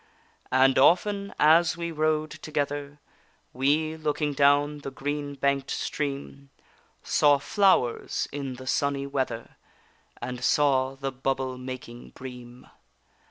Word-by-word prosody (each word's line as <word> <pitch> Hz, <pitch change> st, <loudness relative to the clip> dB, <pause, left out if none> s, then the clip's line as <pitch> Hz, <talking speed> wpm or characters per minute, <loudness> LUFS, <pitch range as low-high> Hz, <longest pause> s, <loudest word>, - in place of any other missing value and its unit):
And 130 Hz, +1 st, +4 dB
often 200 Hz, +7 st, +3 dB
as 165 Hz, +3 st, +5 dB
we 170 Hz, 0 st, -3 dB
rode 155 Hz, 0 st, 0 dB
together, 145 Hz, -1 st, -4 dB, 0.6 s
We, 150 Hz, +5 st, +1 dB
looking 150 Hz, -1 st, -1 dB
down 145 Hz, +1 st, +3 dB
the 140 Hz, -, -6 dB
green 145 Hz, +1 st, -4 dB
bank'd 140 Hz, 0 st, 0 dB
stream, 140 Hz, -1 st, -4 dB, 0.5 s
Saw 145 Hz, -1 st, +4 dB
flowers 185 Hz, -, +1 dB
in 140 Hz, -3 st, -5 dB
the 130 Hz, +1 st, -10 dB
sunny 140 Hz, +1 st, 0 dB
weather, 130 Hz, -5 st, -3 dB, 0.6 s
And 125 Hz, +1 st, -6 dB
saw 135 Hz, -1 st, +2 dB
the 135 Hz, 0 st, -4 dB
bubble 130 Hz, -1 st, -2 dB
making 125 Hz, -2 st, -8 dB
bream. 125 Hz, -1 st, -10 dB
140 Hz, 115 wpm, -26 LUFS, 130-150 Hz, 0.6 s, as